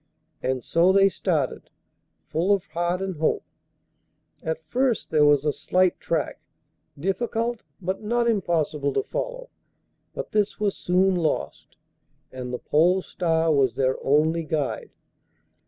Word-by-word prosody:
And 130 Hz, -1 st, -1 dB
so 170 Hz, +3 st, +3 dB
they 195 Hz, 0 st, +5 dB
started, 160 Hz, -8 st, -2 dB, 0.6 s
full 170 Hz, +6 st, 0 dB
of 200 Hz, -3 st, +2 dB
heart 175 Hz, +2 st, -1 dB
and 190 Hz, -4 st, -4 dB
hope. 155 Hz, -, +1 dB, 1.0 s
At 160 Hz, 0 st, -3 dB
first 250 Hz, -3 st, 0 dB
there 150 Hz, -2 st, +5 dB
was 145 Hz, -1 st, +4 dB
a 150 Hz, -, +2 dB
slight 185 Hz, -1 st, +1 dB
track, 165 Hz, -3 st, -2 dB, 0.6 s
difficult, 230 Hz, +6 st, -1 dB, 0.2 s
but 190 Hz, 0 st, -3 dB
not 235 Hz, +2 st, +1 dB
impossible 160 Hz, -9 st, 0 dB
to -, -, +1 dB
follow; -, -, -5 dB, 0.6 s
but -, -, -5 dB
this 210 Hz, -1 st, 0 dB
was 205 Hz, -2 st, 0 dB
soon 185 Hz, +2 st, +2 dB
lost, 155 Hz, -, -2 dB, 0.6 s
and 125 Hz, -1 st, -6 dB
the 125 Hz, -, -2 dB
Pole 180 Hz, +8 st, +2 dB
Star 165 Hz, -2 st, +1 dB
was 130 Hz, -5 st, +2 dB
their 130 Hz, 0 st, 0 dB
only 155 Hz, +4 st, +3 dB
guide. 150 Hz, -3 st, -2 dB
170 Hz, 135 wpm, -25 LUFS, 150-195 Hz, 1.0 s, they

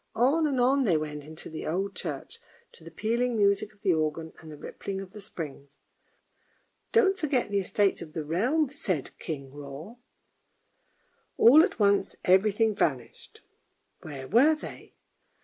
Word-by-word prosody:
On 280 Hz, +8 st, +3 dB
and 270 Hz, -3 st, -1 dB
on 265 Hz, +2 st, +3 dB
they 175 Hz, -7 st, +3 dB
went 150 Hz, -1 st, -5 dB
into 155 Hz, +1 st, -9 dB
the 155 Hz, -, -6 dB
old 195 Hz, +5 st, -2 dB
church, 465 Hz, -, -5 dB, 0.3 s
to 475 Hz, -, -17 dB
the -, -, -10 dB
pealing 235 Hz, +2 st, -1 dB
music 200 Hz, 0 st, +2 dB
of 210 Hz, -1 st, -29 dB
the 190 Hz, -4 st, +3 dB
organ, 160 Hz, 0 st, -2 dB
and 160 Hz, -1 st, -11 dB
the 150 Hz, -, -10 dB
rippling 195 Hz, +6 st, -6 dB
of 195 Hz, -1 st, -8 dB
the 210 Hz, 0 st, -10 dB
springs. 145 Hz, -7 st, -8 dB, 0.6 s
" -, -, -42 dB
Don't 390 Hz, -4 st, +3 dB
forget 270 Hz, -8 st, 0 dB
the 200 Hz, -, +2 dB
Estates 195 Hz, +1 st, +1 dB
of 155 Hz, -2 st, -9 dB
the 155 Hz, -2 st, -4 dB
Realm," 245 Hz, -, +1 dB
said 190 Hz, -, -3 dB
King 140 Hz, -4 st, -6 dB
Hroar. 145 Hz, -, -10 dB, 1.4 s
All 275 Hz, +7 st, +8 dB
at 380 Hz, -, 0 dB
once 200 Hz, -1 st, +2 dB
every 190 Hz, +4 st, +5 dB
thing 220 Hz, +1 st, +1 dB
vanished 130 Hz, -, -3 dB, 0.3 s
— -, -, -46 dB
where 140 Hz, -4 st, -8 dB
were 270 Hz, -, +5 dB
they 305 Hz, -, -10 dB
200 Hz, 165 wpm, -28 LUFS, 155-245 Hz, 1.4 s, All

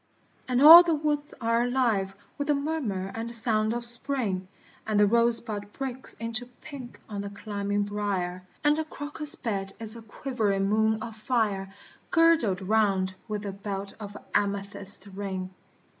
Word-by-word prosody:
And 255 Hz, +1 st, +2 dB
all 330 Hz, +3 st, +12 dB
the 340 Hz, -2 st, +1 dB
woods 295 Hz, -1 st, -2 dB
are 230 Hz, 0 st, +1 dB
alive 235 Hz, -6 st, 0 dB, 0.2 s
with 285 Hz, -, -4 dB
the 295 Hz, -, +3 dB
murmur 270 Hz, -11 st, -3 dB
and 230 Hz, +1 st, -5 dB
sound 220 Hz, -1 st, +4 dB
of 240 Hz, 0 st, -2 dB
Spring, 235 Hz, -6 st, +1 dB, 0.4 s
And 215 Hz, -1 st, +1 dB
the 210 Hz, -, +6 dB
rosebud 230 Hz, -2 st, 0 dB
breaks 265 Hz, -1 st, -6 dB
into 230 Hz, +1 st, -3 dB
pink 275 Hz, -5 st, -10 dB
on 205 Hz, -2 st, -5 dB
the 200 Hz, -, -5 dB
climbing 205 Hz, 0 st, -3 dB
briar, 200 Hz, -3 st, -3 dB, 0.2 s
And 295 Hz, 0 st, +3 dB
the -, -, 0 dB
crocus 295 Hz, 0 st, -1 dB
bed 195 Hz, -4 st, -4 dB
is 220 Hz, 0 st, 0 dB
a 230 Hz, -, -9 dB
quivering 215 Hz, -4 st, -2 dB
moon 220 Hz, +1 st, +1 dB
of 225 Hz, -1 st, -7 dB
fire 215 Hz, -5 st, -1 dB, 0.4 s
Girdled 320 Hz, -, +3 dB
round 195 Hz, -2 st, +1 dB
with 210 Hz, -1 st, -4 dB
the 200 Hz, -, -4 dB
belt 195 Hz, 0 st, -6 dB
of 205 Hz, -1 st, -8 dB
an -, -, -11 dB
amethyst 200 Hz, -1 st, +1 dB
ring. 190 Hz, -2 st, -5 dB
220 Hz, 160 wpm, -27 LUFS, 200-250 Hz, 0.4 s, all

